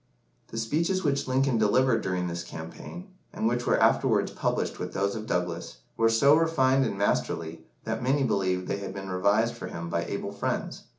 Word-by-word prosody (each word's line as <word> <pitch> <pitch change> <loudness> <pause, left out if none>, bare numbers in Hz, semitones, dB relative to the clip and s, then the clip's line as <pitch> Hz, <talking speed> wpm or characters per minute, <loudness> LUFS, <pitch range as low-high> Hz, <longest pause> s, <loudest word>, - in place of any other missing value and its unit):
The 115 - -8
speeches 165 +11 0
which 140 -3 0
Lincoln 130 -2 +2
delivered 115 +2 +3
during 90 -1 -1
this 85 -1 -3
campaign, 130 - -9 0.2
and 110 - -1
which 120 +1 -1
were - - +3
afterwards - - +3
published - - -2
with - - -5
those 100 +1 0
of 110 0 -6
Douglas, 90 -1 -2 0.2
were 115 0 +3
so 140 +6 +5
refined 135 -5 +3
and 100 - -4
masterly 85 -5 -1 0.2
that - - -3
many 135 +3 +2
believed 95 -6 0
they 100 - -1
had 95 -1 -6
been 95 -1 -6
revised 100 +5 +2
for - - -6
him 85 0 -6
by 85 0 -1
able 100 +2 -4
friends. 100 - -3
110 Hz, 185 wpm, -27 LUFS, 95-130 Hz, 0.2 s, so